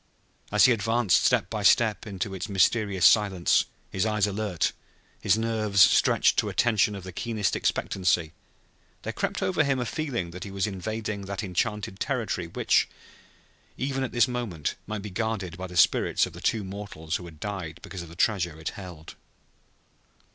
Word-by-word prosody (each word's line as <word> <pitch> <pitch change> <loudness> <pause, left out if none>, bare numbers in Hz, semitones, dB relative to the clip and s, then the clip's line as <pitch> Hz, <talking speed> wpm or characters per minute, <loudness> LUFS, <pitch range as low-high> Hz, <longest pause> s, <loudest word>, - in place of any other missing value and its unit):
As - - +6
he 125 - +6
advanced 115 -2 +2
step - - +3
by 110 - -4
step 110 +2 +3
into 95 -1 -4
its 95 +3 -5
mysterious 100 -1 +2
silence, 100 -5 +4 0.3
his 95 - 0
eyes 105 -2 +2
alert, 100 -3 -1 0.5
his - - +3
nerves 110 -3 0
stretched - - +5
to - - 0
a - - -7
tension 110 -3 +2
of 100 - -8
the 95 - -7
keenest 110 +1 -1
expectancy, 90 -4 0 0.7
there - - -4
crept - - -2
over 175 -4 +2
him 135 -2 0
a 125 - -1
feeling 120 - -3
that 90 +1 -7
he - - -7
was 95 +1 -1
invading 105 +1 -4
that 100 +2 -4
enchanted 100 +1 -2
territory 110 -10 -2
which, 85 - +2 0.9
even 135 0 -2
at 130 - -3
this 120 +1 +3
moment, 115 - -3
might 105 -1 -4
be 105 - -6
guarded 95 -4 -3
by 95 0 -6
the 90 -1 -7
spirits - - +4
of - - -10
the - - -10
two 110 - 0
mortals 95 -4 -5
who 90 - -10
had 80 -3 -12
died 95 -5 -5
because 95 -1 -7
of 85 - -9
the 85 - -12
treasure 85 -6 0
it 80 - -3
held. 90 -5 -10
100 Hz, 175 wpm, -26 LUFS, 90-110 Hz, 0.9 s, As